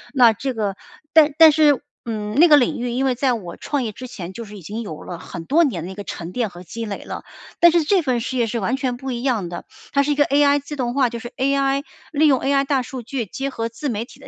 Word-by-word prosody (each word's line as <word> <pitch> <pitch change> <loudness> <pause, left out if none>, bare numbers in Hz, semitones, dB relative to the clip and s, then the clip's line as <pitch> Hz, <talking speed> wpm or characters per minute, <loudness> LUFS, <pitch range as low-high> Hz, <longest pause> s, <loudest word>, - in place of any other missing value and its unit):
那 240 -4 +6
这 260 +3 -4
个 205 -3 -1 0.4
但 305 -2 +6
但 320 -1 +9
是， 295 -3 +3 0.2
嗯， 210 -2 -4
那 345 - +8
个 295 -3 +8
领 245 -2 +1
域， 245 0 -2
因 255 +3 0
为 260 - +2
在 255 0 +1
我 180 -7 -6
创 285 -3 -2
业 220 - -3
之 255 +4 -9
前 185 -6 -8
就 230 +2 -7
是 210 0 -11
已 185 - -12
经 215 +7 -5
有 160 -9 -7
了 175 - -7
很 165 -1 -8
多 330 +4 +4
年 190 - -1
的 185 - -6
一 - - -7
个 205 +1 -7
沉 170 -2 -6
淀 235 -2 -1
和 175 0 -12
积 230 +6 -6
累 205 -2 -6
了。 - - -7 0.4
但 345 -1 +7
是 335 -2 +3
这 370 +3 +3
份 255 -5 0
事 255 +3 -4
业 240 -2 +1
是 230 +1 -2
完 240 +7 0
全 255 -3 -2
不 265 +1 -5
一 240 -1 -3
样 235 -9 0
的， 175 0 -7 0.3
它 280 - +3
是 290 - -1
一 290 - +2
个 290 - +4
AI 285 +1 +4
自 285 +2 -8
动 250 -2 -2
化， 255 -4 +2
就 235 - -5
是 240 0 -7
AI 275 +1 +1 0.3
利 310 +1 +3
用 270 -4 +4
AI 275 0 +1
大 270 -2 +1
数 250 0 -7
据 235 -2 -4
结 270 +7 -4
合 230 -1 -3
自 260 +5 -4
媒 225 0 -2
体 260 - -17
的 275 - -13
250 Hz, 320 characters per minute, -21 LUFS, 220-280 Hz, 0.4 s, 但